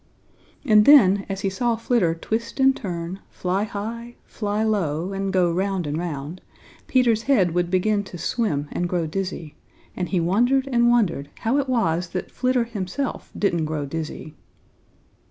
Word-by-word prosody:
And 210 -4 +6
then, 200 -9 +6
as 195 0 -3
he 195 - 0
saw 235 +4 0
Flitter 225 -7 +1
twist 230 +8 -4
and 265 0 +5
turn, 175 -1 -5
fly 190 +3 -1
high, 230 +3 -6
fly 210 0 -2
low, 185 -4 -1
and 195 0 -2
go 180 -3 +2
round 190 0 -1
and 145 0 -2
round, 160 0 -5 0.5
Peter's 240 -4 +3
head 190 -11 +3
would 175 0 0
begin 200 +3 +1
to 180 - -9
swim 165 - -1
and 175 0 -2
grow 175 -2 0
dizzy, 170 -2 -4 0.4
and 180 - -3
he 185 - +1
wondered 245 +10 +2
and 240 -1 +4
wondered 200 -12 +1
how 245 +6 +1
it 270 -2 -2
was 180 -8 0
that 185 - -4
Flitter 255 -1 +1
himself 230 +4 -4
didn't 170 -6 +1
grow 155 -2 -3
dizzy. 155 +1 -6
195 Hz, 160 wpm, -23 LUFS, 175-230 Hz, 0.5 s, And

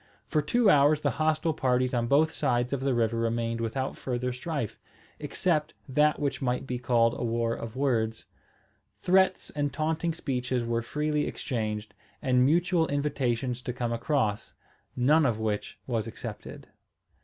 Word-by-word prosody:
For 150 - +1
two 230 +10 +2
hours 145 -2 +5
the 145 - +1
hostile 155 +1 +2
parties 125 -2 +1
on 120 -1 +1
both 155 +5 +3
sides 125 -2 0
of 140 - 0
the 135 -1 0
river 115 -1 +1
remained 115 0 -1
without 130 +4 -2
further 125 0 -2
strife, 130 -3 -4 0.4
except 160 -5 -1
that 150 +3 +3
which 145 -1 -2
might 125 0 -1
be 125 -2 -3
called 120 -1 +3
a - - -2
war 115 0 0
of 115 0 -6
words. 115 -5 0 0.8
Threats 190 0 +3
and 145 -1 -1
taunting 160 +3 -1
speeches 125 -4 -2
were 115 0 -1
freely 150 +4 -1
exchanged, 110 -4 -3 0.3
and 125 -3 +3
mutual 165 +3 +3
invitations 130 -4 -1
to 125 - -4
come 120 -1 -2
across, 115 -4 -1 0.4
none 150 +6 +4
of 120 -6 +1
which 110 -2 -2
was 115 -3 -2
accepted. 115 - -8
130 Hz, 155 wpm, -28 LUFS, 115-150 Hz, 0.8 s, hours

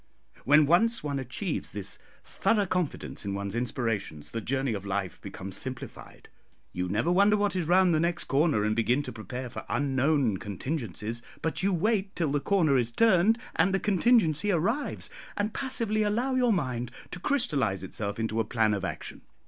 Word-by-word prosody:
When 150 +4 +6
once 220 +9 +3
one 140 -2 -2
achieves 140 - -3
this 100 -2 -2 0.2
thorough 210 -3 +1
confidence 180 -4 -2
in 100 -1 -3
one's 100 +1 -3
inspirations, 115 - -2
the 115 - -3
journey 135 +1 -1
of 100 -2 -4
life 100 -1 -3
becomes 95 -1 -6
simplified. 130 -1 -7 0.5
You 90 0 -2
never 110 - +1
wonder 200 +3 +5
what 205 -1 0
is 175 -4 -1
round 180 0 +5
the 155 - +3
next 170 +1 0
corner, 140 -6 +2
and 110 0 +1
begin 120 +5 +2
to - - -6
prepare 125 +3 -6
for 120 - -7
unknown 135 -4 +1
contingencies; 115 - -4 0.2
but 160 - 0
you 195 +2 +2
wait 195 +2 0
till 160 -5 0
the 145 - +1
corner 155 -6 +3
is 120 -1 -1
turned, 220 - +4 0.2
and 195 -1 +3
the - - +1
contingency 205 - +3
arrives, 205 - -1 0.3
and 210 +1 -1
passively 230 -5 -1
allow 230 +6 +1
your 250 -2 +3
mind 125 - -1 0.2
to 180 - -5
crystallise 135 - 0
itself 100 +3 -4
into 115 0 -1
a - - +3
plan 110 -1 +1
of 100 -2 -2
action. 95 - -5
145 Hz, 175 wpm, -28 LUFS, -, 0.5 s, When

